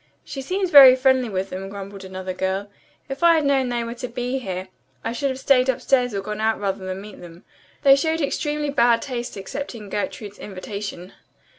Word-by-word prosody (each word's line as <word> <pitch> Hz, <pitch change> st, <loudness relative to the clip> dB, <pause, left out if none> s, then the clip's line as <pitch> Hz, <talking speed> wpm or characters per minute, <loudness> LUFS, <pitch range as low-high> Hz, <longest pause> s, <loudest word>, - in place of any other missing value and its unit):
"She 270 Hz, -, -6 dB
seems 370 Hz, +5 st, -2 dB
very 270 Hz, -4 st, +10 dB
friendly 260 Hz, -2 st, +2 dB
with 190 Hz, -1 st, -3 dB
them," 190 Hz, +1 st, -5 dB
grumbled 200 Hz, 0 st, -8 dB
another 185 Hz, 0 st, -6 dB
girl. 190 Hz, +2 st, -2 dB, 0.4 s
"If 270 Hz, +2 st, -6 dB
I 340 Hz, -1 st, +6 dB
had 310 Hz, -2 st, +1 dB
known 270 Hz, -2 st, +2 dB
they 240 Hz, -1 st, -1 dB
were 230 Hz, 0 st, -5 dB
to 245 Hz, +1 st, -6 dB
be 250 Hz, +2 st, -3 dB
here 185 Hz, -5 st, -5 dB, 0.3 s
I 225 Hz, -, -2 dB
should 275 Hz, +4 st, -1 dB
have 260 Hz, -, -3 dB
stayed 265 Hz, -1 st, +3 dB
upstairs 250 Hz, -2 st, +1 dB
or 195 Hz, -, -1 dB
gone 210 Hz, +2 st, -5 dB
out 220 Hz, 0 st, +1 dB
rather 195 Hz, -1 st, -2 dB
than 185 Hz, 0 st, -4 dB
meet 210 Hz, 0 st, -11 dB
them. 170 Hz, 0 st, -13 dB, 0.4 s
They 275 Hz, -2 st, +8 dB
showed 320 Hz, +3 st, 0 dB
extremely 295 Hz, 0 st, -1 dB
bad 235 Hz, -3 st, +3 dB
taste 245 Hz, -4 st, -5 dB
accepting 225 Hz, 0 st, -6 dB
Gertrude's 205 Hz, 0 st, -5 dB
invitation." 195 Hz, -1 st, -7 dB
235 Hz, 195 wpm, -22 LUFS, 195-270 Hz, 0.4 s, very